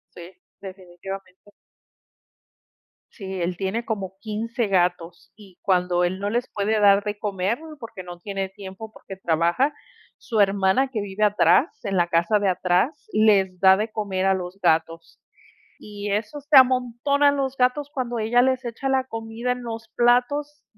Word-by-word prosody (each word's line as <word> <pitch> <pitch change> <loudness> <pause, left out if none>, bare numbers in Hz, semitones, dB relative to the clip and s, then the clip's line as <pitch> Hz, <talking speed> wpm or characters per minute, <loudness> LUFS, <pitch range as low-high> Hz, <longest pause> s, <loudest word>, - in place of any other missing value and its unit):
Sí, 175 +1 -11 0.3
definitivamente. 190 +1 -10 1.6
Sí, 190 -4 -6
él 175 +1 -2
tiene 195 +5 -2
como 195 -5 -4
15 225 +2 -3
gatos 175 -3 -1
y 200 -4 -17
cuando 180 -2 +1
él 180 +2 -1
no 200 +1 -2
les 240 +3 -1
puede 215 +1 0
dar 200 -1 +5
de 210 0 -4
comer 205 +1 -2 0.2
porque 225 -5 -9
no 175 -1 -10
tiene 195 +1 -4
tiempo, 195 +2 -10
porque 195 - -10
trabaja, 175 - +1 0.4
su 230 -5 -3
hermana 195 +5 +3
que 225 -5 -3
vive 200 +1 -3
atrás, 255 - +3
en 195 -2 -1
la 175 -1 +3
casa 170 +5 +2
de 200 -1 +1
atrás, 185 - 0
les 200 -4 +3
da 190 0 +6
de 215 +2 -2
comer 200 -4 -2
a 195 - +4
los 185 +1 -5
gatos, 165 -1 0 0.6
y 205 -1 -6
eso 215 +8 -3
se 290 0 +4
amontonan 260 +3 +3
los 270 -1 -2
gatos 255 +3 +1
cuando 245 -4 -3
ella 225 +3 +3
les 260 0 +1
echa 240 +3 -4
la 265 -1 +1
comida 225 0 -4
en 250 0 -4
los 225 -1 -6
platos. 250 +5 +1
205 Hz, 160 wpm, -23 LUFS, 190-240 Hz, 1.6 s, da